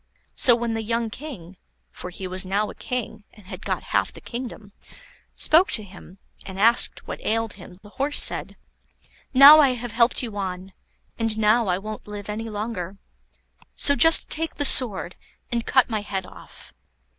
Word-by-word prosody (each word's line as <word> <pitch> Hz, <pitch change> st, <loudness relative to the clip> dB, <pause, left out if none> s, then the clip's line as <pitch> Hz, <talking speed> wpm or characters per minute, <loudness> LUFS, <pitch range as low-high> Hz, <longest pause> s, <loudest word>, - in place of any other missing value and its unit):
So 245 Hz, -, +4 dB
when 235 Hz, -1 st, -3 dB
the 225 Hz, -, -3 dB
young 230 Hz, 0 st, -3 dB
King 205 Hz, -, -10 dB, 0.3 s
for 180 Hz, -, -9 dB
he 190 Hz, +1 st, -9 dB
was 185 Hz, 0 st, 0 dB
now 200 Hz, +3 st, -2 dB
a -, -, -12 dB
king, 225 Hz, -4 st, -6 dB
and 210 Hz, -, -18 dB
had -, -, -10 dB
got -, -, -3 dB
half -, -, +1 dB
the -, -, -13 dB
kingdom 235 Hz, -4 st, -8 dB, 0.6 s
spoke 340 Hz, +5 st, +3 dB
to 215 Hz, -, +2 dB
him, 190 Hz, -1 st, -14 dB, 0.3 s
and 190 Hz, 0 st, -9 dB
asked 230 Hz, +3 st, +1 dB
what -, -, -8 dB
ailed 225 Hz, 0 st, -2 dB
him, 180 Hz, -2 st, -14 dB
the 205 Hz, -, -15 dB
Horse 285 Hz, +5 st, -2 dB
said: -, -, -1 dB, 0.7 s
"Now 280 Hz, +3 st, +9 dB
I 275 Hz, -4 st, +4 dB
have 245 Hz, -1 st, -6 dB
helped 235 Hz, +3 st, +2 dB
you 225 Hz, -4 st, -6 dB
on, 190 Hz, -1 st, -6 dB, 0.5 s
and 225 Hz, -1 st, -2 dB
now 220 Hz, +1 st, +2 dB
I 180 Hz, -1 st, 0 dB
won't 215 Hz, +2 st, -9 dB
live 205 Hz, 0 st, -8 dB
any 225 Hz, +2 st, -5 dB
longer. 205 Hz, -3 st, -6 dB, 0.8 s
So 285 Hz, -, +3 dB
just 325 Hz, +2 st, +6 dB
take 325 Hz, +1 st, -3 dB
the 290 Hz, -, -2 dB
sword, 205 Hz, -10 st, +4 dB, 0.3 s
and 235 Hz, -1 st, -3 dB
cut 260 Hz, -2 st, +3 dB
my 220 Hz, -3 st, -3 dB
head 195 Hz, -2 st, -5 dB
off." -, -, -15 dB
220 Hz, 180 wpm, -23 LUFS, 195-245 Hz, 0.8 s, Now